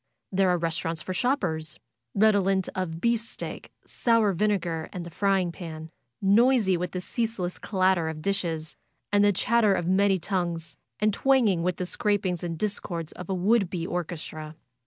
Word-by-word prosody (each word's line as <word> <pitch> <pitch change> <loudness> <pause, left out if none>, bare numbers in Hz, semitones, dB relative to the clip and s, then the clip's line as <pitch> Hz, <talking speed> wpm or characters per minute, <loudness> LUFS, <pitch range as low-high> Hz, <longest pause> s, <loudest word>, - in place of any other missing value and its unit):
There 190 -1 +3
are 180 - +3
restaurants 165 -1 -2
for 185 - -4
shoppers, 180 - 0 0.4
redo 205 -1 +5
lent 190 -1 +1
of 175 -4 -3
beefsteak, 230 +2 -2
sour 230 -4 +2
vinegar 175 -4 0
and 180 -3 -5
the 170 - -8
frying 190 -1 +1
pan; 160 -2 -8 0.3
noisy 215 0 +4
with 180 +1 -3
the 180 - -2
ceaseless 200 -3 -3
clatter 185 -4 +1
of 160 -1 -5
dishes 170 -6 -2 0.4
and 205 0 +4
the 205 - +5
chat 230 +4 +2
ter 205 -2 +5
of 175 - -1
many 190 +2 +3
tongues, 170 -3 -3 0.2
and 215 0 +2
twanging 235 -9 +3
with 180 +1 0
the 180 - -2
scrapings 190 -2 -1
and 165 -2 -3
discords 175 -5 -3
of 180 - -9
a 190 - 0
would 195 +1 +2
be 175 -2 -3
orchestra. 155 -3 -5
185 Hz, 165 wpm, -27 LUFS, 170-205 Hz, 0.4 s, redo